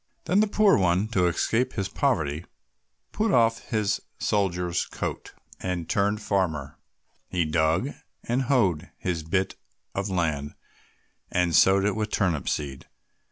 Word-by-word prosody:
Then 190 Hz, -, +3 dB
the 215 Hz, -, +4 dB
poor 205 Hz, -1 st, +4 dB
one, 95 Hz, +3 st, +2 dB
to 90 Hz, -5 st, +2 dB
escape 115 Hz, +8 st, 0 dB
from -, -, -16 dB
his 95 Hz, -, -2 dB
poverty, 85 Hz, -, 0 dB, 0.7 s
put 220 Hz, 0 st, 0 dB
off 115 Hz, -5 st, +2 dB
his 105 Hz, -3 st, +1 dB, 0.2 s
soldier's 90 Hz, -4 st, 0 dB
coat, -, -, -5 dB, 0.2 s
and 90 Hz, -3 st, -3 dB
turned 105 Hz, +1 st, 0 dB
farmer. 80 Hz, -9 st, -1 dB, 0.5 s
He 90 Hz, -2 st, 0 dB
dug 80 Hz, -, +1 dB, 0.3 s
and 120 Hz, +3 st, 0 dB
hoed 100 Hz, -, +1 dB
his 90 Hz, -3 st, -2 dB
bit 95 Hz, +4 st, -1 dB, 0.4 s
of 100 Hz, +1 st, -2 dB
land, 80 Hz, -6 st, -1 dB, 0.8 s
and 90 Hz, -2 st, +1 dB
sowed 95 Hz, +1 st, +5 dB
it 105 Hz, -, +1 dB
with 110 Hz, -1 st, -2 dB
turnip 85 Hz, -10 st, 0 dB
seed. 70 Hz, -3 st, -4 dB
95 Hz, 140 wpm, -26 LUFS, 85-110 Hz, 0.8 s, sowed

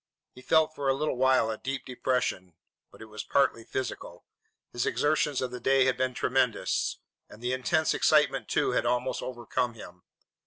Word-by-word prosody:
He 125 Hz, -, -13 dB
felt 160 Hz, +3 st, +3 dB
for 140 Hz, -3 st, -2 dB
a 135 Hz, -, +3 dB
little 150 Hz, +1 st, -1 dB
while 130 Hz, -3 st, +3 dB
a 110 Hz, -, -6 dB
deep 135 Hz, 0 st, -4 dB
depression. 125 Hz, -9 st, -2 dB, 0.4 s
But -, -, -13 dB
it -, -, -9 dB
was 110 Hz, -1 st, -7 dB
partly 135 Hz, -4 st, +1 dB
physical. 130 Hz, +2 st, -6 dB, 0.5 s
His 120 Hz, -, -1 dB
exertions 150 Hz, -2 st, +1 dB
of 125 Hz, -, -3 dB
the 125 Hz, -, -6 dB
day 135 Hz, 0 st, +3 dB
had 130 Hz, -, +2 dB
been 130 Hz, 0 st, -1 dB
tremendous, 130 Hz, -3 st, 0 dB, 0.3 s
and 105 Hz, -, -14 dB
the 125 Hz, +2 st, -2 dB
intense 155 Hz, +5 st, +1 dB
excitement, -, -, +3 dB
too, -, -, +1 dB
had -, -, 0 dB
almost 125 Hz, +1 st, -1 dB
overcome 120 Hz, -1 st, -3 dB
him. 90 Hz, -5 st, -12 dB
130 Hz, 180 wpm, -28 LUFS, 120-135 Hz, 0.5 s, felt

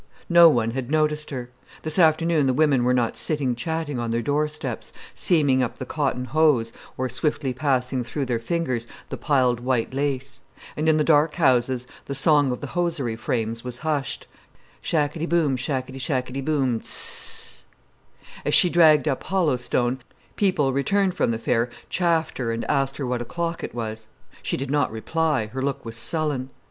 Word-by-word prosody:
No 170 Hz, -1 st, +8 dB
one 115 Hz, -6 st, +1 dB
had 130 Hz, 0 st, -4 dB
noticed 150 Hz, 0 st, +1 dB
her. 125 Hz, -3 st, -6 dB, 0.3 s
This 155 Hz, +4 st, -1 dB
afternoon 160 Hz, -2 st, +3 dB
the 130 Hz, -, +1 dB
women 145 Hz, -4 st, +3 dB
were 125 Hz, -, +2 dB
not 120 Hz, -2 st, +1 dB
sitting 145 Hz, -5 st, 0 dB
chatting 150 Hz, +1 st, -3 dB
on 120 Hz, -1 st, -2 dB
their 115 Hz, +1 st, -1 dB
doorsteps, 150 Hz, -3 st, -2 dB, 0.2 s
seaming 145 Hz, -6 st, +3 dB
up 125 Hz, -, -2 dB
the 130 Hz, -, -5 dB
cotton 135 Hz, -3 st, -1 dB
hose, 140 Hz, -5 st, +2 dB, 0.2 s
or 130 Hz, -, -1 dB
swiftly 135 Hz, +1 st, -1 dB
passing 130 Hz, -1 st, 0 dB
through 140 Hz, +4 st, -3 dB
their 120 Hz, -2 st, -1 dB
fingers 125 Hz, -3 st, -2 dB, 0.2 s
the 135 Hz, -, -5 dB
piled 125 Hz, -2 st, +2 dB
white 125 Hz, -1 st, -1 dB
lace; 135 Hz, -1 st, -3 dB, 0.3 s
and 155 Hz, +1 st, +1 dB
in 155 Hz, -, +4 dB
the 155 Hz, -, +2 dB
high -, -, -4 dB
dark 155 Hz, 0 st, +3 dB
houses 130 Hz, -5 st, +2 dB, 0.2 s
the 140 Hz, -, -5 dB
song 145 Hz, -1 st, +4 dB
of 125 Hz, -, -4 dB
the 145 Hz, -, -7 dB
hosiery 165 Hz, -9 st, -1 dB
frames 115 Hz, 0 st, -2 dB
was 125 Hz, -1 st, -6 dB
hushed: 145 Hz, -4 st, -2 dB, 0.6 s
"Shackety 160 Hz, +1 st, -1 dB
boom, 160 Hz, -6 st, +2 dB
Shackety 130 Hz, 0 st, -3 dB
shackety 130 Hz, 0 st, -2 dB
boom, 135 Hz, -6 st, +1 dB
Z—zzz!" -, -, -1 dB, 0.8 s
As -, -, +2 dB
she 180 Hz, -, +6 dB
dragged 155 Hz, -3 st, +5 dB
up 135 Hz, -3 st, 0 dB
Hollow 175 Hz, -7 st, +1 dB
Stone, 120 Hz, +1 st, -1 dB, 0.4 s
people 180 Hz, -10 st, +1 dB
returned 190 Hz, +8 st, +1 dB
from -, -, 0 dB
the 115 Hz, -, 0 dB
fair 115 Hz, +1 st, 0 dB, 0.2 s
chaffed 165 Hz, -4 st, 0 dB
her 115 Hz, -3 st, -1 dB
and 115 Hz, 0 st, -3 dB
asked 135 Hz, -1 st, 0 dB
her 140 Hz, -, -3 dB
what 125 Hz, -1 st, -2 dB
o'clock 170 Hz, +7 st, -3 dB
it -, -, -6 dB
was. 110 Hz, -2 st, -5 dB, 0.3 s
She -, -, -2 dB
did 135 Hz, 0 st, -4 dB
not 145 Hz, -5 st, +1 dB
reply, 150 Hz, +3 st, 0 dB
her 130 Hz, -, -3 dB
look 140 Hz, -2 st, -2 dB
was 115 Hz, 0 st, -6 dB
sullen. 140 Hz, +1 st, 0 dB
135 Hz, 180 wpm, -24 LUFS, 125-155 Hz, 0.8 s, No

